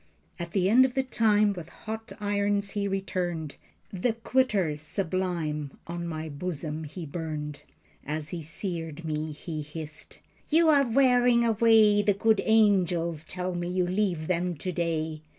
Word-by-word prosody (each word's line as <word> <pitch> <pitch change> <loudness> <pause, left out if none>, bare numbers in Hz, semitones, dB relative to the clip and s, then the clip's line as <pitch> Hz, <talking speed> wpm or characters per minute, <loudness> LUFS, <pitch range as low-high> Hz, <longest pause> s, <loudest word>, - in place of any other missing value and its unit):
At 170 0 -6
the 190 -2 +2
end 240 +6 +6
of 260 -1 0
the 265 - +2
time 215 -4 +3
with 170 -3 -8
hot 220 +1 -7
irons 205 -1 0
he 200 -1 -1
returned. 180 -5 -3 0.4
"The 210 +5 0
Quitter 225 - +1
Sublime" 160 -3 -3
on 170 0 -5
my 160 -1 -4
bosom 155 0 -4
he 160 +3 -7
burned. 150 -2 -5 0.4
As 150 +1 -3
he 170 0 -4
seared 165 -1 -5
me 155 0 -2
he 155 +1 -6
hissed: 150 0 -9 0.3
"You 325 +1 +5
are 280 -3 +5
wearing 245 -1 +4
away. 220 -2 +5
The 205 -1 +2
good 220 +1 +3
angels 180 -7 +3
tell 180 +1 -4
me 175 0 -3
you 180 0 +1
leave 180 -3 0
them 180 0 0
today. 160 -2 -2
180 Hz, 150 wpm, -27 LUFS, 160-210 Hz, 0.4 s, end